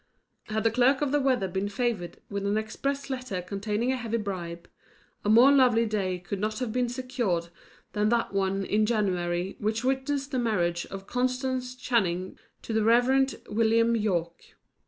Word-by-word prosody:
Had 215 0 -2
the 225 - +3
clerk 255 +4 +3
of 280 - 0
the 290 - +3
weather 255 -8 +2
been 190 +2 -2
favoured 220 -6 -2
with 200 -1 -4
an 205 +1 +1
express 275 +6 -3
letter 255 -8 -3
containing 210 +6 -2
a - - +1
heavy 230 -2 -2
bribe, 175 -5 -5 0.6
a 205 - 0
more 240 +6 +7
lovely 250 -4 +5
day 195 -4 -1
could 180 +2 -5
not 215 +1 -2
have 250 -4 -3
been 250 -1 +1
secured 240 -9 -2 0.4
than 210 0 +1
that 235 -3 0
one 195 0 0
in 215 +2 +2
January 185 -4 -1
which 220 +3 -1
witnessed 270 +2 -1
the 260 - 0
marriage 175 -7 0
of 195 0 -8
Constance 255 +1 -1
Channing 190 -8 0 0.3
to 225 - -4
the 220 -1 +2
Rev. 255 +4 +3
William 230 +1 +3
Yorke. 175 -6 -2
220 Hz, 170 wpm, -27 LUFS, 195-250 Hz, 0.6 s, more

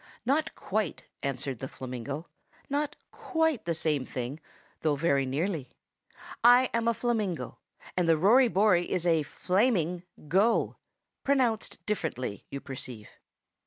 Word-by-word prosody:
"Not 290 +5 +1
quite," 215 +1 -2 0.2
answered 135 -2 -3
the 130 - -4
flamingo. 130 +5 -6 0.4
"Not 290 +1 0 0.2
quite 320 -8 0
the 170 -1 0
same 155 -4 +1
thing, 130 +3 -5 0.4
though 155 -2 +1
very 140 -3 +2
nearly. 150 0 -2 0.7
I 245 +2 +7
am 230 0 +1
a 235 - +4
flamingo, 215 -8 -1 0.4
and 175 -2 +2
the 165 - +5
Rory 235 +10 +6
Bory 190 -5 +3
is 180 -2 0
a 165 -2 +4
flaming 180 - +1 0.3
go; 195 +9 +2 0.5
pronounced 255 -6 +1
differently, 130 - -3
you 140 - -5
perceive. 125 -5 -8
175 Hz, 125 wpm, -29 LUFS, 140-230 Hz, 0.7 s, I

